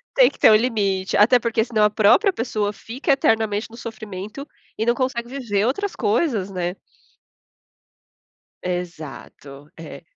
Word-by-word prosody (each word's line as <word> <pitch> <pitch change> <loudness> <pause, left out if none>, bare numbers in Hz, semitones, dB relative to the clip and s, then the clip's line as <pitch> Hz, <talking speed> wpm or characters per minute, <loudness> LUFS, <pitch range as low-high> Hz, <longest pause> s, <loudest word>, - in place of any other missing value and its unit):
Tem - - +6
que - - -19
ter - - +6
um 215 - +7
limite, 200 -5 0
até 240 +5 +5
porque 230 -1 0
se 240 - -17
não 215 -1 +2
a 210 - +4
própria 220 - +4
pessoa 215 -5 -2
fica 255 - -2
eternamente 220 -4 +1
no 230 - -12
sofrimento 220 +2 -8 0.3
e 220 - 0
não 235 +1 +2
consegue 240 -2 -2
viver 230 -7 -2
outras 400 +10 -2
coisas, 215 - 0
né? 180 -1 -3 1.9
Exato. 155 -5 -7
É. 165 - -10
220 Hz, 150 wpm, -22 LUFS, 195-245 Hz, 1.9 s, um